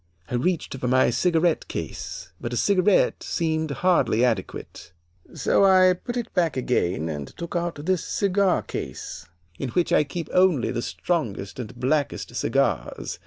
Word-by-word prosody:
I -, -, -3 dB
reached 160 Hz, +5 st, 0 dB
for 130 Hz, -1 st, -3 dB
my 130 Hz, 0 st, +4 dB
cigarette 165 Hz, +5 st, +1 dB
case, -, -, -6 dB
but 120 Hz, -, -4 dB
a -, -, -1 dB
cigarette 200 Hz, -, +3 dB
seemed 160 Hz, -1 st, -1 dB
hardly 140 Hz, -5 st, +2 dB
adequate, 100 Hz, -5 st, -4 dB, 0.4 s
so -, -, +2 dB
I 185 Hz, -1 st, +6 dB
put 240 Hz, +7 st, -6 dB
it 235 Hz, -1 st, -4 dB
back 170 Hz, -6 st, +1 dB
again 90 Hz, -10 st, 0 dB
and 75 Hz, -4 st, -4 dB
took 170 Hz, 0 st, -6 dB
out 175 Hz, 0 st, -1 dB
this 185 Hz, -1 st, +1 dB
cigar 200 Hz, -1 st, +1 dB
case, 80 Hz, -, -6 dB, 0.3 s
in 135 Hz, -, -3 dB
which 175 Hz, +8 st, +1 dB
I -, -, +5 dB
keep 160 Hz, +2 st, -5 dB
only 180 Hz, -8 st, +3 dB
the 120 Hz, -, -2 dB
strongest 120 Hz, -, -3 dB
and 125 Hz, 0 st, -6 dB
blackest 140 Hz, +3 st, -1 dB
cigars. -, -, -1 dB
160 Hz, 155 wpm, -24 LUFS, 125-180 Hz, 0.4 s, I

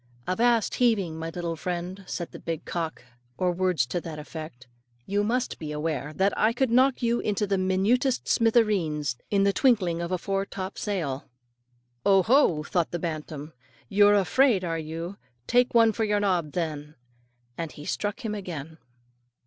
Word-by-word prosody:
"Avast 230 Hz, +3 st, +2 dB
heaving, 210 Hz, -9 st, +2 dB
my 165 Hz, 0 st, -4 dB
little 170 Hz, 0 st, -3 dB
friend," 180 Hz, +4 st, -4 dB
said 170 Hz, -, -4 dB
the -, -, -9 dB
big 165 Hz, -1 st, -4 dB
cock, 165 Hz, -6 st, -4 dB, 0.3 s
or 180 Hz, -1 st, +1 dB
words 180 Hz, -6 st, +1 dB
to 175 Hz, +8 st, -3 dB
that 160 Hz, -2 st, -7 dB
effect; 150 Hz, -4 st, -8 dB, 0.4 s
"you 205 Hz, +1 st, 0 dB
must 245 Hz, +4 st, -1 dB
be 155 Hz, -2 st, -5 dB
aware 150 Hz, -1 st, -2 dB
that 195 Hz, +5 st, +1 dB
I 220 Hz, +2 st, +3 dB
could 250 Hz, 0 st, 0 dB
knock 260 Hz, +1 st, +3 dB
you 235 Hz, 0 st, +2 dB
into 210 Hz, 0 st, 0 dB
the 195 Hz, -1 st, 0 dB
minutest 205 Hz, +8 st, +1 dB
smithereens 190 Hz, -, +2 dB
in 200 Hz, -1 st, +3 dB
the 200 Hz, 0 st, +3 dB
twinkling 190 Hz, -11 st, +2 dB
of 170 Hz, +1 st, -4 dB
a 185 Hz, -, +1 dB
foretop 195 Hz, 0 st, -3 dB
sail." 155 Hz, -10 st, -3 dB, 0.7 s
"Oho!" 195 Hz, -, +4 dB
thought 170 Hz, +1 st, 0 dB
the 175 Hz, -, -3 dB
bantam, 155 Hz, -2 st, -5 dB, 0.4 s
"you're 205 Hz, +1 st, +5 dB
afraid, 205 Hz, +1 st, +3 dB
are 165 Hz, -2 st, -2 dB
you; 165 Hz, +4 st, -6 dB, 0.3 s
take 245 Hz, 0 st, +2 dB
one 230 Hz, -1 st, +6 dB
for 220 Hz, +1 st, -2 dB
your 210 Hz, -1 st, +1 dB
nob, 180 Hz, -7 st, 0 dB
then," 155 Hz, -3 st, -3 dB, 0.6 s
and 165 Hz, +1 st, -4 dB
he 145 Hz, -, -10 dB
struck 205 Hz, +2 st, -3 dB
him 215 Hz, -, -1 dB
again. 165 Hz, -6 st, -6 dB
185 Hz, 165 wpm, -26 LUFS, 160-210 Hz, 0.7 s, one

